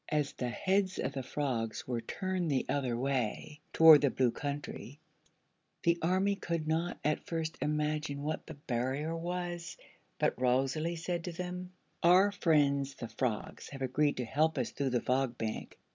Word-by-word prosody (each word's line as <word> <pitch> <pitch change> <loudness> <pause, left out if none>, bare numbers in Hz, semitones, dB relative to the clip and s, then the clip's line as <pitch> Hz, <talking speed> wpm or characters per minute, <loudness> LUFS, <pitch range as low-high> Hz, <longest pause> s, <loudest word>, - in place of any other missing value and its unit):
As 150 -2 0
the 125 - -3
heads 190 +7 +1
of 135 - -2
the 135 - -3
frogs 125 -5 -2
were 120 -2 -1
turned 185 - -2
the 135 -3 +1
other 130 -4 0
way, 135 +3 -2
toward 160 -3 +9
the 140 - +4
Blue 125 -2 +2
Country, 145 0 -5 0.9
the 170 0 +3
army 190 +4 +2
could 170 -5 -3
not 165 +3 0
at 150 0 0
first 160 -1 -2
imagine 150 -1 -1
what 155 +1 -3
the - - -7
barrier 140 +4 -2
was; 175 0 -4 0.4
but - - 0
Rosalie 135 +6 +1
said 170 +1 -3
to 180 - -3
them: 180 +1 -5 0.3
"Our 185 +4 +6
friends 140 -7 +2
the 115 -3 -6
frogs 110 -1 -3
have 135 -1 -6
agreed 145 +3 +1
to 125 - -2
help 155 +6 +1
us 125 - -1
through 140 -1 -1
the 125 -1 +1
Fog 130 -1 0
Bank. 110 -1 -4
150 Hz, 165 wpm, -32 LUFS, 130-170 Hz, 0.9 s, toward